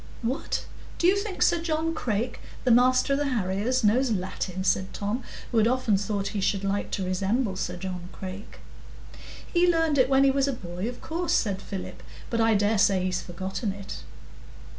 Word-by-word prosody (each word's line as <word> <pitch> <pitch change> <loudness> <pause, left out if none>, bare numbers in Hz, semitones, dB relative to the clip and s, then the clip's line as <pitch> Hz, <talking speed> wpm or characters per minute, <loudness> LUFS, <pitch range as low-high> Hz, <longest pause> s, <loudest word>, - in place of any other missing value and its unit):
"What! 255 +7 -2 0.3
do - - 0
you 370 +3 +6
think 400 -1 -1
Sir 345 -2 +3
John 325 0 0
Crake, 240 -4 -2 0.2
the 255 - +3
master 255 +3 +4
of 275 - +1
the 290 - 0
harriers, 225 +1 0
knows 245 +5 +3
Latin?" 185 -2 -2
said 190 0 +1
Tom, 210 +5 -2 0.3
who 235 - +3
had 220 - +4
often 250 -4 +2
thought 200 0 -1
he 205 -1 -3
should 195 0 0
like 200 +1 -1
to 190 - -1
resemble 195 +4 0
Sir 180 -1 -3
John 180 -1 -6
Crake. 190 +2 -8 0.9
"He 350 0 +5
learned 325 -4 +2
it 260 - +4
when 270 0 +5
he 275 - +5
was 275 0 +1
a 275 - 0
boy, 180 -1 -5
of 245 - -9
course," 340 +2 -2
said 195 -4 +1
Philip. 195 -2 -7 0.3
"But 230 -1 +1
I 225 -1 +4
dare 205 +1 +2
say 195 -2 +4
he's 185 -1 -1
forgotten 190 +4 -4
it." 195 0 -8
215 Hz, 190 wpm, -27 LUFS, 190-265 Hz, 0.9 s, you